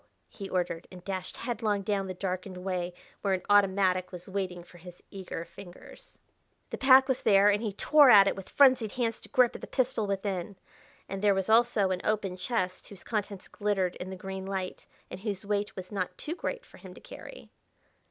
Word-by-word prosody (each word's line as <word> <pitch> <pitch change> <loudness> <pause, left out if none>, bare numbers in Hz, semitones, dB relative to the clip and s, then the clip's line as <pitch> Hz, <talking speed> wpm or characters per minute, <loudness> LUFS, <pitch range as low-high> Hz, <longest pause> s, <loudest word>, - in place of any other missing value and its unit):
he 195 -2 -8
ordered, 175 -2 -2
and 180 -1 -11
dashed 185 -2 -5
headlong 220 -4 -2
down 195 -1 -1
the 185 - -4
darkened 185 0 -4
way 180 -1 -3 0.3
where 195 -2 +1
an 185 - -6
automatic 190 -2 +3
was 180 -1 -9
waiting 185 -3 -4
for 175 0 -17
his 180 +1 -13
eager 185 -3 -6
fingers. 195 - -14 0.5
The - - -5
pack 265 0 +7
was 260 -2 0
there, 200 -1 +5
and 205 +1 0
he 220 -3 -2
tore 290 +6 +5
at 200 -4 +8
it - - +1
with 195 - -9
frenzied 255 -6 +4
hands 230 -3 -1
to - - -16
grip 250 -2 +4
at - - -9
the - - -7
pistol 250 -5 0
within. 195 -1 -3 0.5
And 195 0 -5
there 205 -1 +4
was 195 +1 -2
also 225 -4 +4
an 180 - -2
open 200 -4 -1
chest 185 -1 -3
whose 200 -3 -13
contents 205 -3 -4
glittered 195 -4 -1
in 185 - -7
the 190 - -6
green 190 0 -6
light, 190 -2 -5 0.2
and - - -7
whose 200 -2 -4
weight 205 0 -2
was 185 +1 -8
not 185 -3 -3
too 310 - -5
great - - -5
for - - -17
him - - -12
to - - -12
carry.... - - -12
195 Hz, 200 wpm, -29 LUFS, 185-215 Hz, 0.5 s, at